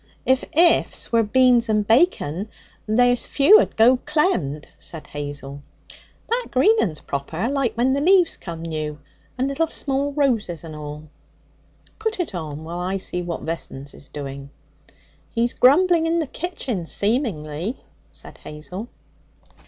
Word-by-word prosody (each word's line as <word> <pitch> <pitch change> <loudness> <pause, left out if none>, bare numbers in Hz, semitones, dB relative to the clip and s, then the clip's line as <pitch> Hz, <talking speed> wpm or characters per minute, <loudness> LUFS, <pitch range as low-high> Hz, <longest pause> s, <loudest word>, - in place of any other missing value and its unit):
'If 260 0 +2
ifs 345 +1 +3
were 230 -1 +4
beans 240 +1 +3
and 210 -1 +1
bacon, 220 - +2 0.4
there's 245 +3 +3
few'd 315 +10 +5
go 240 +4 +6
clemmed,' 290 - 0
said 160 -2 -7
Hazel. 145 -1 -7 0.7
'That 475 +2 -1
green 375 - +4
un's 155 -6 -2
proper, 160 +8 -3
like 275 -2 0
when 250 +3 +2
the 280 - 0
leaves 360 +1 +4
come 165 -2 -8
new, 155 -2 -4 0.4
and 260 +2 0
little 275 +4 0
small 280 -2 -1
roses 230 - 0
and 160 -2 -8
all.' 150 0 -8 0.9
Put 440 -2 -2
it 335 - -2
on 155 -3 -5
while 170 +2 -6
I 185 +2 -1
see 180 -2 -4
what 175 -1 -4
Vessons 145 -4 -6
is 140 - -9
doing.' 140 -1 -7 0.9
'He's 235 +1 +1
grumbling 330 +5 +4
in 335 +1 +1
the 325 - 0
kitchen, 260 - -4
seemingly,' 200 - -1 0.3
said - - -12
Hazel. 180 +8 -8
220 Hz, 140 wpm, -22 LUFS, -, 0.9 s, go